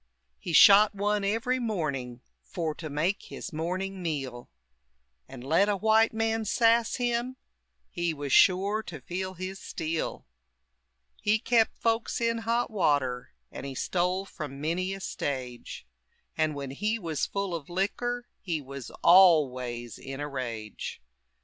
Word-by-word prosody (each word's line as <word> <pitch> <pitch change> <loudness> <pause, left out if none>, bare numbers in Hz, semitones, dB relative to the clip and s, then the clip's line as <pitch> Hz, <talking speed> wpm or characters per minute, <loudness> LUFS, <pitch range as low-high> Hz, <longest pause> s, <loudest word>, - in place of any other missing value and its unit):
He - - -5
shot 205 +5 +8
one 205 +1 0
every 230 +5 0
morning, 140 - -3 0.2
For 165 -3 -3
to 155 0 -7
make 160 +8 0
his - - -8
morning 185 +4 -3
meal. 135 -7 -4 0.8
And 130 -2 -10
let 165 +9 +3
a 205 - +1
white 220 +2 +4
man 225 0 0
sass 230 +1 +3
him, 245 +1 -1 0.5
He 175 -1 -1
was 145 -3 -4
shore 200 +3 +4
to 175 -8 -8
feel 185 +7 -5
his 185 +2 -6
steel. 160 0 -4 1.0
He 210 +1 +3
kept 230 0 +2
folks 230 0 0
in 230 0 +1
hot 230 +1 0
water, 140 - 0 0.2
And - - -8
he 135 -1 -6
stole 180 +5 0
from 150 -7 -7
many 170 +5 -1
a - - -8
stage; 130 - -5 0.5
And 155 -1 0
when 140 -2 -5
he 210 +10 -1
was 165 -8 -2
full 200 -2 -3
of 165 -3 -5
liquor 240 +7 -2
He 170 -5 -2
was 140 -2 -8
always 130 - +4
in 135 0 -7
a 145 - -3
rage. 115 -6 -5
180 Hz, 145 wpm, -28 LUFS, 140-210 Hz, 1.0 s, shot